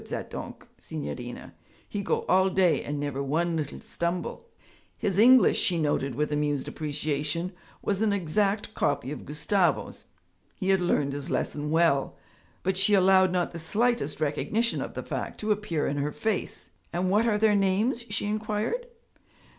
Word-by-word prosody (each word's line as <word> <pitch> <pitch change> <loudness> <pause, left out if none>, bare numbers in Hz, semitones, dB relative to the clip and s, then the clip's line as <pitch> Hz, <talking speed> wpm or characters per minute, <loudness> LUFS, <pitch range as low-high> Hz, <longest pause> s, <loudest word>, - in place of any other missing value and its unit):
Zat - - -5
donk', - - -7
signorina, 125 -6 -6 0.3
he 205 - -3
go - - -1
all 190 +1 +4
day 185 -3 +2
and 145 0 -3
never 145 -1 -2
one 165 +5 0
little 150 -3 -3
stumble.' 175 - -3 0.5
His 195 -1 0
English, 250 +3 +7
she 175 -3 +1
noted 140 -4 0
with 150 +1 -1
amused 145 -2 0
appreciation, 150 +3 -2 0.3
was 200 0 0
an 220 -1 +3
exact 200 +3 0
copy 145 - 0
of 150 - -7
Gustavo's; 175 +5 0 0.5
he 190 -2 -2
had 190 -1 +4
learned 145 -5 +1
his 145 0 -5
lesson 150 0 -2
well. 160 -4 +2 0.5
But 190 0 0
she 195 +2 +4
allowed 190 -1 +5
not 180 -1 0
the 170 - -6
slightest 210 - 0
recognition 210 +10 0
of - - -6
the - - -4
fact - - -5
to 215 0 0
appear 200 -7 0
in 145 - -1
her 145 +1 -1
face. 220 +2 -3 0.2
'And 180 +2 0
what 215 +4 +3
are 210 -2 +2
their 215 0 +4
names?' 205 +6 +1
she - - -1
inquired. 215 - -2
180 Hz, 160 wpm, -27 LUFS, 150-205 Hz, 0.5 s, English